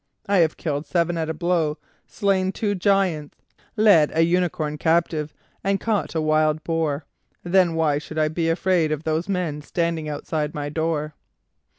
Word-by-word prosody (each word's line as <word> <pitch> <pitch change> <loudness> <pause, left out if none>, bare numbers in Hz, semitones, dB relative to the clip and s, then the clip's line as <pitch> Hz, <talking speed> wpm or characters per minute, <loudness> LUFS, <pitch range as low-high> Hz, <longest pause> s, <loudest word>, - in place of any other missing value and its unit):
I 200 0 +2
have 165 -3 +3
killed 145 -2 -3
seven 170 +3 +1
at 160 -1 -2
a - - -1
blow, 165 -3 0 0.3
slain 190 -2 0
two 205 0 -1
giants, 185 -6 0 0.4
led 200 -9 +6
a 165 - +5
unicorn 165 -3 0
captive, 160 -2 +1 0.3
and 195 0 +1
caught 205 -8 -1
a 160 - +1
wild 155 0 +2
boar, 160 -3 -1 0.4
then 175 -1 +3
why 155 -3 +2
should 155 +1 -9
I 155 0 +3
be 165 +1 -1
afraid 165 -1 +1
of 155 0 -2
those 160 +4 -1
men 175 -6 -2
standing 165 0 -2
outside 150 0 -3
my 145 -1 -3
door?" 155 -1 -2
165 Hz, 165 wpm, -23 LUFS, 155-180 Hz, 0.4 s, led